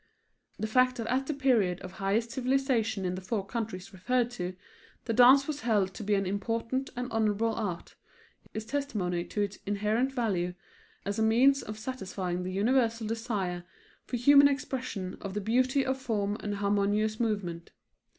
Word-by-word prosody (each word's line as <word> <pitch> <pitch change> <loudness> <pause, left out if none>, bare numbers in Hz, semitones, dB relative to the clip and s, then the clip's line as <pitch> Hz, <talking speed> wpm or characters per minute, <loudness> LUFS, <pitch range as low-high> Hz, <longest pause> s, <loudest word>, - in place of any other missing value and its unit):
The - - -2
fact 255 +3 +3
that 230 - -4
at 265 +1 0
the 305 - -1
period 230 -10 +2
of 185 - -8
highest 205 +5 -1
civilization 255 -6 0
in 180 - -1
the 185 - -5
four 195 +1 -2
countries 200 -3 -5
referred 240 +6 0
to 180 -5 -4 0.5
the 230 - -1
dance 255 +4 +7
was 295 -1 -3
held 205 -5 +1
to - - -7
be 205 0 +2
an 195 0 0
important 230 +7 -2
and 245 0 -3
honorable 225 0 +1
art, 200 -7 -4 0.6
is 220 0 -5
testimony 210 -11 -2
to 210 - -3
its 200 -1 -5
inherent 210 +6 +1
value 190 -9 -1 0.5
as 200 +2 -2
a - - +2
means 250 +5 +4
of 215 0 -7
satisfying 190 -7 -4
the 185 +1 -4
universal 230 +3 +1
desire 210 -6 -2 0.4
for 245 - -2
human 280 +4 +7
expression 255 -9 -3
of 195 -1 -6
the - - 0
beauty 255 +6 +2
of 265 0 -1
form 205 -5 -1
and 205 -1 -3
harmonious 205 +2 +1
movement. 195 -7 -2
220 Hz, 170 wpm, -29 LUFS, 195-250 Hz, 0.6 s, dance